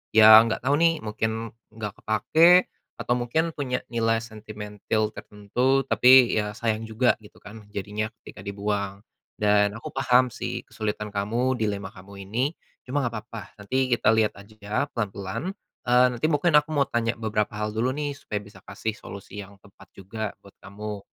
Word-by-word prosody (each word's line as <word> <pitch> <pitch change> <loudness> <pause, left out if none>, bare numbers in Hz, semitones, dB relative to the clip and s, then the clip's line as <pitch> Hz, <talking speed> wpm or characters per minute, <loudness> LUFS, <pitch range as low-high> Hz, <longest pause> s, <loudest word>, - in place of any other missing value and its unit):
Yang 110 0 +10
enggak 110 - -2
tahu 140 +2 +3
nih, 165 0 +5
mungkin 110 +1 -1 0.4
enggak 105 -3 -5
kepakai 130 - +4 0.5
atau 120 - 0
mungkin 160 +8 0
punya 125 -3 -2
nilai 115 -1 +1
sentimentil 110 -1 -4
tertentu, 125 +7 0
tapi 125 -1 +6
ya 105 -1 0
sayang 110 0 -2
juga, 110 +3 +2
gitu 105 - -17
kan, 105 +1 -12
jadinya 105 +2 -4
ketika 90 - -12
dibuang, 100 -1 -3 0.4
dan 105 -1 +3
aku 115 +3 -8
paham 125 +1 +4
sih 120 - -6
kesulitan 105 0 -4
kamu 115 +6 0
dilema 100 -4 -2
kamu 100 +1 -11
ini. 125 +8 0 0.3
Cuma 140 +3 -2
enggak 115 -1 -3
papa, 115 -4 -8
nanti 130 +6 -1
kita 120 -3 +3
lihat 110 -1 +2
aja 105 +4 -4
pelan-pelan, 105 - -4 0.3
eee, 125 +1 +6
nanti 120 +5 -3
mungkin 160 +2 +2
aku 155 +1 -7
mau 140 - +4
tanya 115 0 0
beberapa 105 -2 -2
hal 105 0 -2
dulu 120 +4 0
nih 145 -1 -2
supaya 105 -6 -4
bisa 100 +1 -15
kasih 110 - -4
solusi 100 +1 -9
yang 100 0 -10
tepat 100 - -18
juga 105 +2 -5
buat 100 - -17
kamu. 105 +1 -7
110 Hz, 165 wpm, -25 LUFS, 105-125 Hz, 0.5 s, Yang